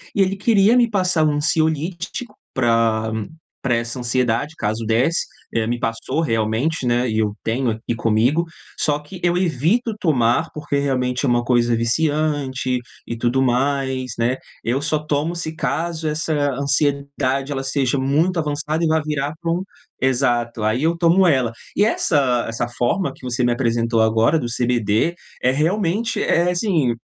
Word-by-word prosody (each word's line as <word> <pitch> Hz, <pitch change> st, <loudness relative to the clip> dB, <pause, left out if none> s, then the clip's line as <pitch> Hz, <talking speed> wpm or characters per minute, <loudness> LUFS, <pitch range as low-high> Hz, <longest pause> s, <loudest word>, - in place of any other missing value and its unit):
E 200 Hz, -, +3 dB
ele 195 Hz, +1 st, +2 dB
queria 210 Hz, +2 st, +4 dB
me 240 Hz, -1 st, +4 dB
passar 185 Hz, -6 st, +1 dB
um 150 Hz, -, +2 dB
ansiolítico 160 Hz, -, -1 dB, 0.2 s
pra 115 Hz, -3 st, +2 dB, 0.5 s
pra 125 Hz, -3 st, +2 dB
essa 115 Hz, +2 st, -3 dB
ansiedade 125 Hz, +4 st, 0 dB
caso 110 Hz, +1 st, -2 dB
desse, 125 Hz, +9 st, +1 dB, 0.3 s
eh 110 Hz, -1 st, 0 dB
me 120 Hz, +1 st, -1 dB
passou 115 Hz, +6 st, -2 dB
realmente, 115 Hz, +3 st, 0 dB
né, 120 Hz, +1 st, +2 dB
e 110 Hz, -1 st, 0 dB
eu 105 Hz, -1 st, 0 dB
tenho 120 Hz, +2 st, 0 dB
aqui 110 Hz, +2 st, -3 dB
comigo. 115 Hz, +9 st, +2 dB, 0.3 s
Só 150 Hz, -1 st, +1 dB
que 150 Hz, +5 st, -11 dB
eu 175 Hz, 0 st, +2 dB
evito 185 Hz, -, +1 dB
tomar, 135 Hz, -1 st, +2 dB
porque 150 Hz, -2 st, -2 dB
realmente 130 Hz, -1 st, 0 dB
é -, -, +2 dB
uma 120 Hz, 0 st, +2 dB
coisa 120 Hz, -1 st, +2 dB
viciante 135 Hz, 0 st, 0 dB, 0.3 s
e 115 Hz, -, -4 dB
tudo 120 Hz, +3 st, 0 dB
mais, 130 Hz, 0 st, 0 dB
né. 120 Hz, +3 st, +1 dB, 0.3 s
Eu 125 Hz, +4 st, 0 dB
só 155 Hz, +1 st, 0 dB
tomo 150 Hz, +3 st, -1 dB
se 160 Hz, -2 st, -5 dB
caso 160 Hz, +4 st, -2 dB
essa 155 Hz, +1 st, -1 dB, 0.2 s
ansiedade 140 Hz, 0 st, 0 dB
ela 135 Hz, -2 st, -2 dB
seja 135 Hz, 0 st, 0 dB
muito 155 Hz, +7 st, +1 dB
avançada 150 Hz, +1 st, -2 dB
e -, -, +3 dB
vai 160 Hz, 0 st, +3 dB
virar 150 Hz, -1 st, -1 dB
pra 170 Hz, -1 st, -2 dB
um 175 Hz, +2 st, 0 dB, 0.4 s
exato. 120 Hz, -3 st, +1 dB
Aí, 110 Hz, +4 st, +1 dB
eu 165 Hz, +2 st, +1 dB
tomo 175 Hz, +2 st, +4 dB
ela. 130 Hz, -7 st, +2 dB, 0.3 s
E 205 Hz, -, +5 dB
essa 135 Hz, -, +1 dB
essa 115 Hz, +1 st, -2 dB
forma 120 Hz, +10 st, -1 dB
que -, -, -21 dB
você 125 Hz, 0 st, -2 dB
me 120 Hz, -, +3 dB
apresentou 115 Hz, -1 st, +1 dB
agora 110 Hz, +7 st, +3 dB
do 120 Hz, -, -3 dB
CBD 120 Hz, +3 st, +1 dB, 0.3 s
é 130 Hz, -, +4 dB
realmente 185 Hz, -, 0 dB
é 170 Hz, +1 st, +2 dB
assim, 170 Hz, -, +1 dB
135 Hz, 165 wpm, -21 LUFS, 120-160 Hz, 0.5 s, E